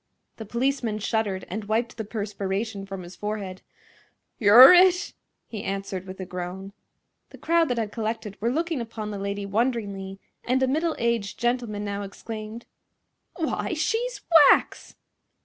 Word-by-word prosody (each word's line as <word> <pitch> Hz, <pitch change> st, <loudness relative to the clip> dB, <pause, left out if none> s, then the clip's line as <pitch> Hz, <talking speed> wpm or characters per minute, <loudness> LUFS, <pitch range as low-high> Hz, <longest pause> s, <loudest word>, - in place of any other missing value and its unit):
The 220 Hz, -, -7 dB
policeman 235 Hz, -1 st, -1 dB
shuddered 210 Hz, -3 st, -2 dB
and 210 Hz, +3 st, -5 dB
wiped 225 Hz, +2 st, -1 dB
the 220 Hz, -, -3 dB
perspiration 205 Hz, -1 st, -4 dB
from 195 Hz, -2 st, -7 dB
his 175 Hz, +1 st, -11 dB
forehead. 205 Hz, -3 st, -5 dB, 0.8 s
"You're 235 Hz, -, +10 dB
it!" 360 Hz, 0 st, +4 dB, 0.3 s
he 215 Hz, -3 st, -6 dB
answered, 195 Hz, -1 st, -4 dB
with 185 Hz, +1 st, -9 dB
a 185 Hz, -, -4 dB
groan. 180 Hz, +2 st, -6 dB, 0.6 s
The -, -, -13 dB
crowd 335 Hz, 0 st, +2 dB
that 245 Hz, -, -1 dB
had 220 Hz, -3 st, -2 dB
collected 220 Hz, -2 st, -4 dB
were 230 Hz, -, +1 dB
looking 320 Hz, +1 st, -1 dB
upon 220 Hz, -2 st, -6 dB
the 200 Hz, -, -5 dB
lady 200 Hz, 0 st, -3 dB
wonderingly, 200 Hz, -3 st, -2 dB, 0.2 s
and 260 Hz, +2 st, +1 dB
a -, -, +3 dB
middle 315 Hz, +4 st, 0 dB
aged 230 Hz, -4 st, -1 dB
gentleman 240 Hz, -4 st, -1 dB
now 200 Hz, 0 st, -3 dB
exclaimed: 215 Hz, +3 st, -8 dB, 0.7 s
"Why, 325 Hz, -3 st, -2 dB
she's -, -, -1 dB, 0.3 s
wax!" -, -, +1 dB
215 Hz, 150 wpm, -25 LUFS, 200-240 Hz, 0.8 s, You're